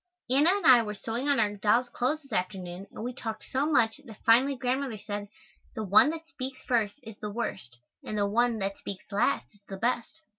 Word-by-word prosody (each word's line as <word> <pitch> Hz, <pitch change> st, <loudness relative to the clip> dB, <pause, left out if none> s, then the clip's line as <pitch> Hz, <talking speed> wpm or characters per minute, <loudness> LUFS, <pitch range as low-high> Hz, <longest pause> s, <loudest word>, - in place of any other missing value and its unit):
Anna 285 Hz, +6 st, +5 dB
and 400 Hz, +2 st, +1 dB
I 250 Hz, -2 st, +8 dB
were 210 Hz, -2 st, -4 dB
sewing 230 Hz, +7 st, -3 dB
on 280 Hz, -, +3 dB
our 205 Hz, -2 st, +1 dB
dolls' 215 Hz, +5 st, +2 dB
clothes 280 Hz, +6 st, -1 dB
this 275 Hz, -4 st, -12 dB
afternoon 185 Hz, 0 st, -3 dB
and -, -, -8 dB
we 250 Hz, +1 st, -3 dB
talked 225 Hz, -3 st, -5 dB
so 270 Hz, +3 st, 0 dB
much 260 Hz, -4 st, +2 dB
that 225 Hz, -7 st, -12 dB
finally 255 Hz, +5 st, +5 dB
Grandmother 255 Hz, -1 st, -1 dB
said, 205 Hz, 0 st, -5 dB, 0.5 s
"the 220 Hz, -, -3 dB
one 210 Hz, +7 st, +6 dB
that 325 Hz, +1 st, -5 dB
speaks 260 Hz, -5 st, -7 dB
first 225 Hz, -5 st, +1 dB
is 220 Hz, -3 st, -11 dB
the 210 Hz, -, -4 dB
worst; 190 Hz, -, -5 dB, 0.3 s
and 215 Hz, -, -4 dB
the 205 Hz, -, +2 dB
one 235 Hz, +3 st, +2 dB
that 195 Hz, -1 st, -3 dB
speaks 195 Hz, -2 st, -7 dB
last 200 Hz, -, +1 dB
is 205 Hz, -, -26 dB
the 195 Hz, -, -5 dB
best." 240 Hz, +7 st, -2 dB
230 Hz, 215 wpm, -28 LUFS, 205-260 Hz, 0.5 s, I